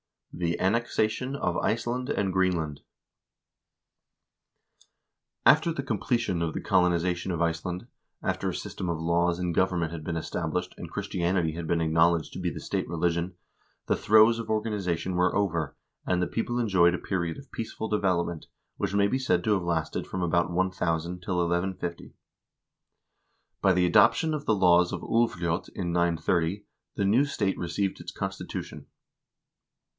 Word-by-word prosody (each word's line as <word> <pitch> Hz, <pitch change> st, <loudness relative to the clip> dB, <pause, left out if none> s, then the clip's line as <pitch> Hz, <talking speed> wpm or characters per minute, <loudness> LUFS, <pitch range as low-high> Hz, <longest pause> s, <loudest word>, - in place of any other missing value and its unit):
68. 85 Hz, -1 st, -2 dB
The 85 Hz, -, -2 dB
Annexation 115 Hz, +4 st, 0 dB
of 90 Hz, -10 st, -1 dB
Iceland 120 Hz, +3 st, -1 dB
and 95 Hz, -2 st, 0 dB
Greenland 85 Hz, -6 st, 0 dB, 2.7 s
After 155 Hz, +3 st, +6 dB
the 140 Hz, -4 st, -3 dB
completion 115 Hz, -5 st, -1 dB
of 80 Hz, -1 st, -1 dB
the -, -, -2 dB
colonization 90 Hz, -1 st, +1 dB
of 85 Hz, -1 st, -2 dB
Iceland, 85 Hz, +3 st, -1 dB, 0.4 s
after -, -, -1 dB
a -, -, -4 dB
system 90 Hz, -, -5 dB
of 85 Hz, -, -1 dB
laws 85 Hz, +1 st, +1 dB
and 90 Hz, -1 st, -2 dB
government 90 Hz, -3 st, +1 dB
had 85 Hz, -2 st, -6 dB
been 80 Hz, +1 st, -3 dB
established, 80 Hz, -, -3 dB
and -, -, -7 dB
Christianity 85 Hz, -2 st, -1 dB
had 80 Hz, +1 st, -5 dB
been 85 Hz, +1 st, +1 dB
acknowledged 80 Hz, 0 st, +2 dB
to -, -, -6 dB
be 90 Hz, -1 st, -1 dB
the 80 Hz, -, -7 dB
state -, -, -2 dB
religion, 85 Hz, +1 st, -1 dB, 0.5 s
the -, -, +1 dB
throes 110 Hz, +2 st, +5 dB
of 115 Hz, -, -5 dB
organiza 105 Hz, -5 st, -1 dB
tion 90 Hz, +2 st, -4 dB
were 90 Hz, +1 st, +2 dB
over, 85 Hz, -7 st, 0 dB, 0.3 s
and 90 Hz, -, +2 dB
the 90 Hz, -, +1 dB
people 120 Hz, +1 st, -2 dB
enjoyed 95 Hz, -7 st, +4 dB
a -, -, -2 dB
period 85 Hz, -4 st, -2 dB
of 140 Hz, -, -13 dB
peaceful 110 Hz, 0 st, -4 dB
develop 95 Hz, -5 st, +1 dB
ment, 85 Hz, -2 st, -7 dB, 0.3 s
which 100 Hz, -, -2 dB
may 100 Hz, 0 st, +4 dB
be 130 Hz, +6 st, 0 dB
said 130 Hz, -, +1 dB
to 110 Hz, -, +2 dB
have 95 Hz, -, +1 dB
lasted 85 Hz, -2 st, -2 dB
from 95 Hz, -, -3 dB
about 85 Hz, +1 st, +2 dB
1000 90 Hz, -1 st, -1 dB
till 90 Hz, +1 st, -3 dB
1150. 85 Hz, 0 st, -2 dB, 1.5 s
By 95 Hz, -2 st, +4 dB
the 90 Hz, 0 st, +3 dB
adoption 115 Hz, -, +4 dB
of 150 Hz, -1 st, -3 dB
the 110 Hz, -, +3 dB
laws 90 Hz, -2 st, +4 dB
of -, -, -3 dB
Ulvljot 90 Hz, -8 st, 0 dB
in 90 Hz, -3 st, -2 dB
930 85 Hz, +2 st, +1 dB, 0.3 s
the 100 Hz, -, 0 dB
new 115 Hz, +8 st, +4 dB
state 100 Hz, -9 st, -1 dB
received 95 Hz, +3 st, -2 dB
its -, -, -7 dB
constitution. -, -, -5 dB
90 Hz, 160 wpm, -27 LUFS, 85-105 Hz, 2.7 s, After